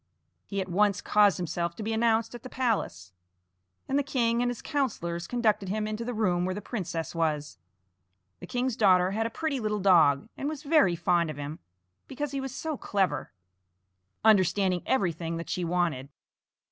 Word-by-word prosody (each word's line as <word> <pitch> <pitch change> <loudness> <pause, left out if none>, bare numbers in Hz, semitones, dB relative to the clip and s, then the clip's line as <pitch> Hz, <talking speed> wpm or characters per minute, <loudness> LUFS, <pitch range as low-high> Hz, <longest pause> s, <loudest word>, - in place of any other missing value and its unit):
He 200 - -3
at 185 - -4
once 200 +2 +2
caused 205 -3 +4
himself 170 0 -2
to 215 - -6
be 225 +1 -2
announced 225 0 +1
at 240 - -8
the 255 - -9
palace, 210 - -2 0.8
and 275 +1 +1
the - - +1
king 235 -4 +1
and 245 - +1
his 245 - -6
councillors 175 - -2
conducted 220 -5 +1
him 210 +2 -1
into 215 +2 -3
the 245 0 -4
room 180 -5 +1
where 185 +1 -1
the - - -4
princess 180 -7 -4
was. 150 - -2 0.8
The - - -9
king's 250 -1 -1
daughter 185 -4 +4
had 225 +3 0
a - - -6
pretty 310 +1 -2
little 215 -2 -1
dog, 165 -7 +4
and 280 - -3
was 305 -1 -6
very 285 - +4
fond 170 0 +1
of 155 - -6
him, 145 +2 -6 0.5
because 285 +1 -4
he 275 -1 -3
was 270 -1 -5
so 310 +3 -4
clever, 195 -5 -1 0.9
understanding 190 -3 +4
everything 170 -8 0
that 165 - -6
she 180 - -1
wanted. 165 -6 -1
205 Hz, 180 wpm, -28 LUFS, 170-240 Hz, 0.9 s, caused